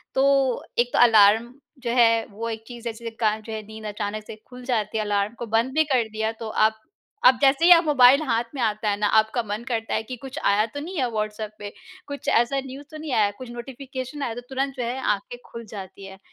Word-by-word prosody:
तो 270 -2 +2 0.2
एक 240 0 +3
तो - - +2
अलार्म 225 0 +5 0.3
जो 235 - -1
है, 230 -2 +4
वो 225 +3 -5
एक 220 -1 -5
चीज़, 240 -2 -10
जिसके 230 +1 -6
कारण, 215 -1 +1
जो 220 +1 -8
है, 220 - -4
नींद 220 0 -10
अचानक 210 0 -4
से - - -7
खुल 250 0 -11
जाती 220 -4 -1
है। 215 - 0
अलार्म 205 +1 0
को 235 - -4
बंद 230 +4 0
भी 315 +2 +4
कर 240 -3 +2
दिया, 220 0 -2
तो 225 0 -7
आप 220 0 +1 0.4
आप 255 -1 +7
जैसे 275 +4 +4
ही 355 - +7
आप 340 -1 +8
मोबाइल 275 -1 +6
हाथ 235 -5 +1
में 265 - -3
आता 215 -1 0
है 200 - 0
ना, 210 - +2
आपका 220 +3 +2
मन 210 +1 -5
करता 225 -2 -2
है - - 0
कि, 255 +3 -7
"कुछ 270 +3 -9
आया 205 +2 +3
तो 285 - -4
नहीं 340 +5 -6
है 255 -4 +1
व्हाट्सऍप 215 -1 -3
पे? 205 -1 -7 0.4
कुछ 285 -1 -7
ऐसा 240 +4 +2
न्यूज़ 270 +2 -9
तो 310 - -8
नहीं 305 -3 -5
आया?" 205 -3 +3
कुछ 255 -2 -9
नोटिफ़िकेशन 260 +3 -7
आया, 235 -4 -2
तो 245 - -6
तुरंत, 270 +1 -2
जो 245 - -2
है, 245 +3 -3 0.2
आँखें 200 +5 -10
खुल 230 -1 -9
जाती 195 -1 -9
हैं। 195 0 -11
230 Hz, 245 wpm, -24 LUFS, 215-260 Hz, 0.4 s, आप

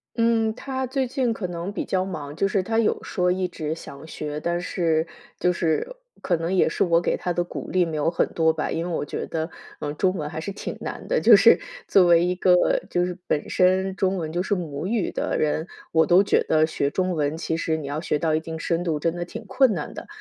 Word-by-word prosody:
嗯， 230 -1 +2
他 260 0 -4
最 260 0 -1
近 250 -1 0
可 225 -4 -4
能 175 +2 -5
比 205 - -4
较 185 -1 0
忙， 150 -6 -6
就 195 - +1
是 195 -1 0
他 225 +3 0
有 225 - +1
说 180 -1 0
一 185 0 0
直 155 -3 -4
想 140 -2 -10
学， 150 -1 -5
但 170 +2 -1
是 165 -3 0 0.3
就 180 - +2
是 170 - -1 0.3
可 180 - +1
能 165 +2 -3
也 185 - +4
是 - - +1
我 170 -2 +3
给 170 - 0
他 180 - -3
的 175 0 0
鼓 175 - -7
励 185 -1 +2
没 160 -2 -4
有 150 +1 +1
很 170 - +1
多 160 -1 +3
吧。 160 -1 -3
因 165 - -1
为 175 - -4
我 160 - -2
觉 - - -4
得， 160 0 -3 0.3
嗯， 145 0 -4
中 185 +2 +2
文 150 -5 -3
还 160 - -5
是 200 - -4
挺 195 - -6
难 - - -6
的， - - +1
就 - - +8
是 - - +7 0.3
作 190 -2 +5
为 170 0 +5
一 180 - +1
个 180 -1 +3
就 175 0 +1
是 180 0 -5
本 150 - -1
身 185 +1 +2
中 190 0 0
文 160 -3 -3
就 175 - 0
是 200 +2 0
母 165 -3 -4
语 220 -1 0
的 - - -2
人， 155 +2 0 0.2
我 160 0 +4
都 180 +3 +5
觉 - - +3
得 155 0 +3
学 140 -3 -1
中 185 +4 -1
文， 150 -1 -1
其 160 0 -2
实 160 -1 -1
你 155 - -6
要 145 +2 -3
学 160 - 0
到 160 0 +1
一 - - +2
定 160 0 -6
深 170 +2 -1
度， 160 -4 -1
真 165 +2 0
的 175 - -3
挺 175 - -8
困 260 -2 +3
难 160 -5 -5
的。 - - -8
175 Hz, 270 characters per minute, -24 LUFS, 160-190 Hz, 0.3 s, 就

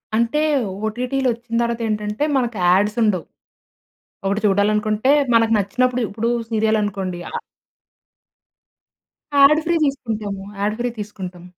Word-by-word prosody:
అంటే 235 +6 +1 0.5
ఓటీటీలొచ్చిన 240 0 -1
తర్వాతేంటంటే 220 0 -2
మనకు 240 -3 -1
యాడ్స్ 205 +5 +3
ఉండవు. 190 -6 +1 1.0
ఒకటి 200 +2 0
చూడాలనుకుంటే 210 +5 +2 0.2
మనకు 225 0 +4
నచ్చినప్పుడు 250 +5 0
ఇప్పుడు 225 +4 -2 0.2
సీరియల్ 220 0 +2
అనుకోండి. 190 -3 -3
అ - - -4 2.0
యాడ్ 285 +3 +7
ఫ్రీ 340 +1 +1
తీసుకుంటాము. 220 -8 -3 0.2
యాడ్ 210 +1 0
ఫ్రీ 245 - 0
తీసుకుంటాం. 185 -4 -7
220 Hz, 105 wpm, -20 LUFS, 205-240 Hz, 2.0 s, యాడ్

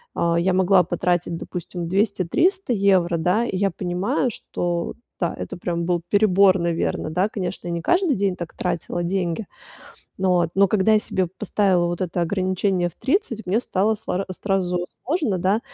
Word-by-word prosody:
а, 170 0 +1
я 185 +2 +2
могла 185 0 +4
потратить, 175 0 -1
допустим, 175 -1 -6
200-300 230 - +1
евро, 190 -4 +3
да. 180 +8 +1
И 195 - -3
я 195 0 +1
понимаю, 185 +7 -1
что, 175 -3 -3 0.2
да, 170 - 0
это - - -6
прям 170 -1 -2
был 175 -1 0
перебор, 200 -2 +4
наверно. 170 -2 -1
Да, 185 +6 +1
конечно, 185 -3 -4
я - - -2
не 170 - -2
каждый 350 - +2
день 195 -2 0
так 170 -2 -7
тратила 175 0 -2
деньги, 180 +2 -2 0.7
ну 190 -1 +1
вот. 175 -2 +2
Но 200 0 +6
когда 215 +1 +3
я - - +5
себе 185 -4 -1
поставила 190 -4 +2
вот 175 +1 -3
это 175 0 -1
ограничение 185 0 0
в - - -17
30, 260 - -1
мне 210 +6 +2
стало 210 0 +1
слар 195 -3 -3
сразу 180 -2 -1 0.2
сложно, 280 - 0
да. 195 +5 +1
185 Hz, 170 wpm, -22 LUFS, 175-200 Hz, 0.7 s, Но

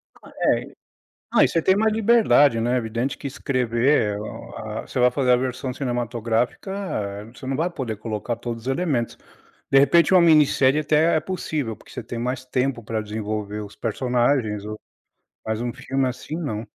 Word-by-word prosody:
É, - - -1 0.7
ah, - - +5
e - - +5
você 165 - 0
tem 190 +3 +4
mais 220 +2 +2
liberdade, 215 - +4
né. 120 +2 +1
Evidente 120 +3 -2
que 140 - -6
escrever, 125 -5 +1
o - - -8
ah, - - -5
você - - -3
vai 125 0 +6
fazer 130 -1 +1
a - - +7
versão 130 +1 -3
cinematográfica, 120 - -2
eh, 105 - -4
você 115 +3 -12
não 135 - -1
vai 165 +4 +1
poder 125 -10 -4
colocar 110 +2 -3
todos 115 -1 -6
os - - -9
elementos. 135 -5 -1 0.5
De 135 - +7
repente 165 +7 +5
uma 185 - +7
minissérie 150 -4 +5
até 155 +2 +3
é - - +3
possível, 155 -8 -3
porque - - -18
você - - -6
tem 120 - -6
mais 125 +2 -3
tempo 125 -1 -1
para 110 0 -2
desenvolver 105 0 -4
os 100 - -11
personagens, 120 -2 0
ou 105 0 -6 0.7
mais 110 0 -2
um 120 0 -2
filme 135 +1 -1
assim, 130 +5 -6
não. 115 -10 -4
125 Hz, 180 wpm, -23 LUFS, 115-145 Hz, 0.7 s, a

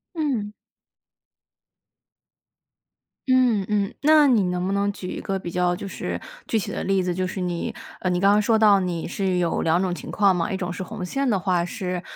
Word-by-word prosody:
嗯。 255 -10 -1 2.8
嗯 250 -6 +3
嗯， 205 -2 0
那 305 0 +6
你 230 -6 +4
能 180 0 -1
不 195 - -1
能 200 0 +1
举 185 -2 -7
一 - - -5
个 195 0 -2
比 175 -2 -6
较 180 0 +1
就 200 +1 -7
是 - - -4 0.3
具 225 - +1
体 205 - -3
的 - - -4
例 195 -1 +1
子， 180 -1 -1
就 185 +1 -1
是 190 - -5
你， 175 -1 -3 0.3
呃， 185 - 0
你 180 0 +1
刚 195 +1 +5
刚 210 +1 +4
说 220 +1 +3
到 210 -2 +5
你 175 -3 -3
是 185 0 -1
有 170 -2 0
2 165 +2 +2
种 180 -2 -1
情 - - -8
况 200 -3 +3
嘛。 170 +1 -1
一 190 - -1
种 180 -1 -3
是 - - -6
红 190 -1 -5
线 275 +6 -1
的 205 - +2
话 180 -2 +1
是， 180 -1 -4
190 Hz, 215 characters per minute, -23 LUFS, 180-210 Hz, 2.8 s, 那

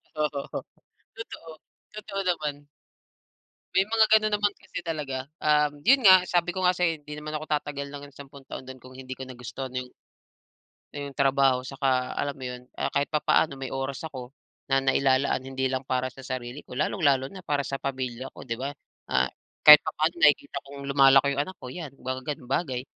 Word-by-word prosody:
O 155 - 0
oo. 140 -1 -4 0.5
Totoo, 195 -7 -9 0.4
totoo 205 -2 -4
naman. 150 -4 -2 1.1
May 190 +2 +3
mga 225 -1 +5
gano'n 215 0 +4
naman 205 0 +1
kasi 175 - -9
talaga, 140 -5 -3 0.2
um, 150 -1 +2
yun 260 - +4
nga 185 -1 +9
sabi 175 0 +1
ko 185 - -3
nga 180 0 +3
sa'yo 165 -3 +1
hindi 150 0 -8
naman 150 0 -6
ako 155 0 -3
tatagal 140 -1 -6
ng 145 0 -8
sampung 140 0 -13
taon - - -7
do'n 130 - -8
kung 130 +1 -14
hindi 130 0 -8
ko 130 - -6
nagustuhan 130 +1 -7
yung 125 0 -4 1.0
yung 140 -2 -7
trabaho 135 -2 +3
tsaka 130 -1 0
alam 140 -1 -2
mo 130 - -8
yun, 125 0 -6
kaya - - -1
kahit 140 0 +1
papaano 150 -1 +2
may 135 -1 -6
oras 135 +2 -4
ako 130 -5 -7 0.4
na 135 0 +3
nailalaan 135 0 +2
hindi 130 0 -2
lang 130 0 -3
para 130 0 -1
sa 135 - -12
sarili 130 +1 -5
ko, 125 - -11
lalong-lalo 140 -3 +1
na 190 - -9
para 145 -5 -1
sa 135 0 -4
pamilya 130 -2 -4
ko, - - -9
di 115 -3 -3
ba? 140 - -2 0.4
Ah, 65 0 +3 0.4
kahit 150 -1 +12
papaano 155 +2 -1
nakikita 145 -3 +3
kong 140 0 -9
lumalaki 135 0 +6
yung 140 - -1
anak 185 +5 -8
ko - - -10
yan, 165 -5 -6
mga 130 0 -4
ganung 135 -3 -4
bagay. 130 -5 -1
140 Hz, 190 wpm, -27 LUFS, 130-155 Hz, 1.1 s, kahit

